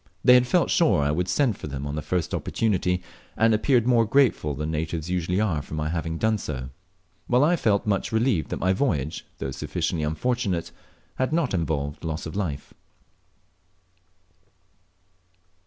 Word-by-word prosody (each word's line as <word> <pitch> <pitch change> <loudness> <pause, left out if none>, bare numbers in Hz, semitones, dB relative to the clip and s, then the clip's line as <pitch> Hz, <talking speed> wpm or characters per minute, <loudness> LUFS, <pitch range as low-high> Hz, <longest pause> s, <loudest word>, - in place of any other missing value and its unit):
They 125 - +7
had 125 0 +5
felt 175 +6 +2
sure 160 - +3
I 70 - +1
would 90 +4 -1
send 115 +3 +1
for - - -6
them 70 -1 -5
on 70 - -4
the 75 - -3
first 80 +3 -2
opportunity, 90 -4 0 0.3
and 115 0 +4
appeared 120 +2 +3
more 120 -2 +4
grateful 115 - +2
than 75 +3 -3
natives 80 +1 -3
usually 90 +1 0
are 90 -9 0
for 75 - -8
my 75 0 -2
having 80 0 -3
done 110 +3 +1
so; 65 -6 -5 0.6
while 125 +3 +4
I 170 +4 +4
felt 105 -10 +1
much 100 -2 0
relieved 110 -6 +1
that - - -3
my 95 +1 +1
voyage, 80 - -1
though 65 - -4
sufficiently 80 +4 -2
unfortunate, 95 +2 -1 0.5
had 130 +2 0
not 160 -7 0
involved 75 -5 -2
loss 80 -1 -3
of 80 - -7
life. 80 -8 -4
90 Hz, 165 wpm, -25 LUFS, 75-115 Hz, 0.6 s, They